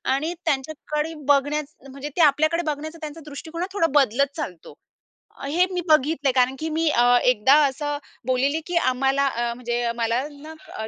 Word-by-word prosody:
आणि 310 +5 -2
त्यांच्याकडे 300 +1 -2
बघण्याच 290 +1 +1 0.2
म्हणजे 275 +2 -7
ते - - +3
आपल्याकडे 310 +3 +3
बघण्याचं 310 +2 -4
त्यांचं 310 +1 -7
दृष्टिकोनात 320 +4 -6
थोडा 335 -5 +2
बदलत 275 +2 +1
चालतो. 185 - -7 0.7
हे 320 +6 +2
मी 360 -1 -2
बघितलंय. 300 -2 +3
कारण 255 0 +2
की 320 - -3
मी 320 +1 +1
अ, 245 -2 +4
एकदा 250 +1 +4
असं 290 +2 -3 0.3
बोललेली, 275 +5 +1
की 355 - -3
आम्हाला 270 -1 +2
अ, 240 -2 -2
म्हणजे 240 0 -2
मला 235 +3 -1
ना, 295 -6 -9
285 Hz, 155 wpm, -23 LUFS, 255-315 Hz, 0.7 s, अ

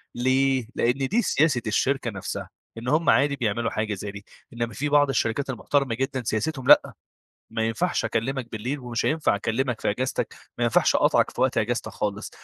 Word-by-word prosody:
ليه؟ 130 0 +2
لأن 130 +3 +1
دي 235 +5 +2
سياسة 145 - +2
الشركة 130 +2 0
نفسها، 100 -2 -5 0.3
إن 115 +2 -7
همّ 155 +5 +2
عادي 140 0 +4
بيعملوا 115 -2 -1
حاجة 110 -1 -2
زي 100 +1 -5
دي، 100 0 -10 0.3
إنما 120 -1 -3
في 145 +6 -2
بعض 145 -1 +4
الشركات 135 +1 0
المحترمة 130 0 0
جدًا 135 0 -2
سياستهم 130 +4 -2
لأ، - - +6 0.6
ما 110 - -2
ينفعش 170 +11 -1
أكلمك 125 +1 -2
بالليل، 125 +7 -3
ومش 120 -3 -3
هينفع 155 -6 +2
أكلمك 115 +3 -1
في - - +1
أجازتك، 130 +5 -2 0.2
ما - - +1
ينفعش - - +3
أقاطعك - - +3
في - - -7
وقت - - +2
أجازتك - - -1
خالص. - - -3
125 Hz, 180 wpm, -25 LUFS, 115-140 Hz, 0.6 s, لأ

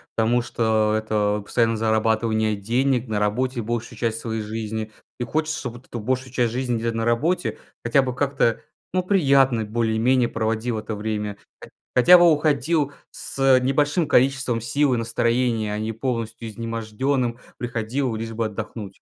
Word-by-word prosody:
потому 115 +2 +2
что 110 -2 +1
это 105 -1 0
постоянное 115 +2 +1
зарабатывание 110 0 +1
денег, 120 +4 0
на 105 -1 0
работе 120 +5 0
большую 115 +1 -4
часть 115 -1 -1
своей 110 -1 -3
жизни. 110 0 -4 0.3
И 120 - -1
хочется, 155 +3 -1
чтоб 125 -3 -5
вот 120 +2 -14
эту 120 - -6
большую 130 +3 -2
часть 120 -2 0
жизни, 125 -1 -1
где 115 +1 -1
на 115 0 -2
работе, 150 +11 0 0.3
хотя 120 +4 +3
бы 125 -1 -3
как-то, 135 -4 +1 0.3
ну, 185 0 +1
приятно 135 - +3
более-менее 115 +3 +1
проводил 110 +1 -1
это 110 0 -5
время. 105 -1 -3 0.3
Хо - - -10 0.3
хотя 175 +8 +8
бы 175 -1 +6
уходил 150 0 +1 0.2
с, - - -8
э, 135 -1 +5
небольшим 145 +5 +1
количеством 130 -3 +2
сил 140 +4 +1
и - - +1
настроения, 115 -1 0
а - - -2
не 110 +1 -2
полностью 115 -1 -4
изможденным 115 +3 -2 0.2
приходил 120 +1 -2
лишь 115 +1 -5
бы 115 0 -2
отдохнуть. 105 -1 -6
115 Hz, 160 wpm, -23 LUFS, 110-130 Hz, 0.3 s, хотя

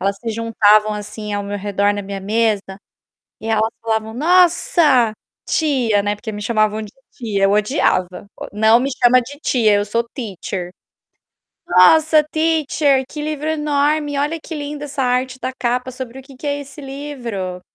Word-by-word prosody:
elas 195 +1 -1
se 230 +2 -4
juntavam, 215 -1 +3
assim, 210 0 -6
ao 205 0 -2
meu 205 0 -4
redor 205 0 0
na 205 - -4
minha 195 0 -6
mesa, 210 -1 0 0.6
e 220 - -8
elas 220 0 +1
falavam: 220 -1 -2
"Nossa, 335 - +3 0.4
tia", 250 -10 +1
né, 205 +1 -1
porque 220 +1 -7
me 210 0 -6
chamavam 215 -1 +1
de 210 - -10 0.2
tia 210 -5 -1
eu 195 - +3
odiava, 205 - 0
o - - -8
"Não 220 +3 +4
me 270 +2 -1
chama 250 0 +6
de 275 +4 -10
tia 225 -8 +2
eu 205 - +2
sou 230 +3 -1
teacher". 190 - -5 1.0
"Nossa, 310 - +5
teacher, 310 -4 +1
livro 300 0 -3
enorme. 295 -1 0
Olha 300 +4 -1
que 325 - -7
lindo 290 0 -5
essa 280 -1 -3
arte 255 +1 -1
da 260 - -3
capa. 250 +1 -1
Sobre 255 0 -8
o 265 - -13
que 275 -1 -15
que 280 +3 -7
é 285 0 -1
esse 280 +1 -11
livro?". 245 -10 -6
235 Hz, 170 wpm, -19 LUFS, 210-285 Hz, 1.0 s, chama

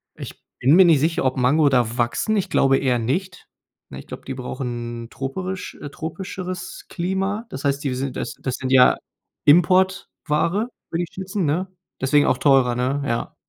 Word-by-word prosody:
Ich - - -9 0.2
bin 140 +6 +5
mir 190 0 +8
nicht 160 -5 +5
sicher, 160 -2 0
ob 130 0 +1
Mango 145 +4 +4
da 120 -2 +1
wachsen. 120 - 0
Ich 195 - -1
glaube 135 0 +3
eher 125 -3 +1
nicht. 170 - -3 0.4
Ne, - - -8
ich - - -13
glaube, - - -9
die 135 - -4
brauchen 120 -2 -5
troperisch 180 +9 -5
äh, 145 - -6
tropischeres 185 +3 -6
Klima. 195 +5 -2
Das 135 - -7
heißt, 140 +1 0
die 135 -3 -1
sind 130 0 -3
das - - -4
das 130 -2 -2
sind 130 0 -4
ja 130 -1 +6 0.5
Importware, 185 +3 +2 0.2
würde 170 +1 -1
ich 170 - -9
schätzen, 190 -1 -3
ne? 175 +6 0 0.3
Deswegen 145 +2 +3
auch 125 - +2
teurer, 135 -4 +4
ne? 135 +3 -1
Ja. 115 -2 -3
145 Hz, 180 wpm, -22 LUFS, 130-185 Hz, 0.5 s, mir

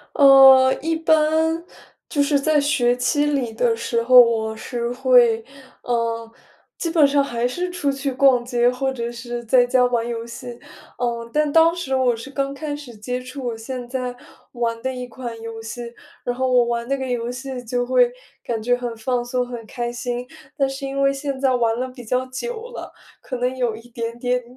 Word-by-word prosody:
呃， 270 -2 +8
一 325 +2 -1
般， 320 +1 +2 0.5
就 290 - +1
是 285 0 +3
在 305 +1 +2
学 255 -4 +2
期 290 +4 +1
里 260 -6 -1
的 230 0 +2
时 230 0 -1
候， 255 +1 +8
我 225 -2 +4
是 240 0 -4
会， 245 -3 +4 0.4
呃， 230 -1 -1 0.5
基 335 - -2
本 315 -4 +5
上 280 0 +2
还 240 -3 -1
是 355 +8 -3
出 350 -6 -2
去 275 0 -2
逛 255 -2 +4
街， 245 -1 +2
或 265 +2 -1
者 235 -2 -4
是 240 0 -6
在 245 +1 +4
家 250 0 +3
玩 240 -2 0
游 235 -1 -4
戏。 245 +2 -9 0.5
嗯， 235 -1 -2
但 300 -1 +1
当 330 +1 +6
时 275 -7 -2
我 255 -2 +3
是 230 +4 -8
刚 275 0 -2
开 290 +1 -4
始 290 -5 -10
接 250 +4 -4
触 255 +2 -8
我 235 - -2
现 245 +2 -6
在 250 -1 -3 0.4
玩 230 -2 -2
的 260 0 -2
一 250 -1 -6
款 235 -2 -7
游 225 0 -7
戏， 235 +1 -7 0.3
然 245 0 -1
后 260 +1 -1
我 245 -1 +5
玩 235 0 -2
那 275 - +1
个 265 -1 -4
游 240 -1 -2
戏 255 0 -6
就 245 +1 -1
会 250 -1 +3 0.3
感 225 -2 -3
觉 245 +2 +2
很 245 -2 -5
放 240 +2 -1
松、 250 0 -2
很 240 -2 -7
开 240 +1 -4
心。 245 0 -4 0.3
但 275 -1 +2
是 270 +1 -6
因 275 0 -2
为 275 0 +3
现 275 -1 -4
在 265 -2 +2
玩 230 -1 +1
了 260 - -2
比 250 -1 -11
较 250 +3 -1
久 450 - -6
了， - - -8 0.3
可 255 - -5
能 250 +1 -1
有 245 -3 0
一 230 +2 -14
点 230 0 -5
点 250 0 0
250 Hz, 215 characters per minute, -21 LUFS, 240-275 Hz, 0.5 s, 呃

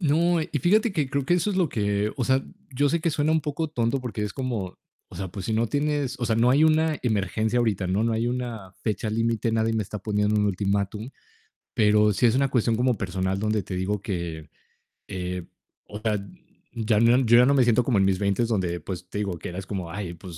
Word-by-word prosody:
No, 165 +2 +2
y - - -6
fíjate 210 +5 +3
que 150 -6 0
creo 140 0 -1
que 175 - +2
eso 180 +4 +1
es 190 - -2
lo 175 -5 +2
que, 105 -1 -1
o 125 - -1
sea, 130 +1 +2 0.3
yo 145 +3 +2
sé 170 +3 0
que 165 - +1
suena 155 -1 0
un 160 - +3
poco 150 +1 -3
tonto 120 -2 0
porque 120 -4 -4
es 105 -1 -3
como, 120 -9 -4 0.3
o - - -14
sea, 95 +1 -4
pues 95 +1 -7
si - - -1
no 110 +1 +1
tienes 145 -3 -1
o 120 - -2
sea, 110 - +1
no 120 +2 +4
hay 145 +4 +5
una 155 -1 +3
emergencia 110 +1 0
ahorita, 105 -5 0
¿no? 95 +4 +1
No 115 0 +1
hay 115 +1 0
una 120 -6 -4
fecha 110 0 -2
límite, 115 +1 0
nadie 110 0 +1
me 110 -1 0
está 105 - -6
poniendo 105 +1 0
un 105 -1 +2
ultimátum, 100 +3 -1 0.6
pero 105 -1 +4
sí 100 - 0
es 115 - +3
una 135 +1 +2
cuestión 115 -3 +1
como 125 -1 +2
personal 95 0 -2
donde 105 0 0
te 90 +1 -6
digo 100 +2 -1
que, 85 -6 -5 0.6
eh, 90 -2 -5 0.4
o 105 - -8
sea, 110 -1 0 0.6
ya 110 -2 +1
no 115 +2 +5
yo 120 -2 +5
ya 125 - +7
no 140 - +4
me 140 - +4
siento 120 +1 +3
como 115 -4 +1
en 95 - +4
mis 95 -1 +2
20 100 +4 +1
donde, 90 -6 -1
pues, 90 +2 -7
te 105 - -5
digo 95 -4 -2
que - - -7
eras 95 +2 -7
como: 90 -5 -4
"Ay, 90 -3 -5
pues, 85 -1 -10
110 Hz, 240 wpm, -25 LUFS, 100-130 Hz, 0.6 s, ya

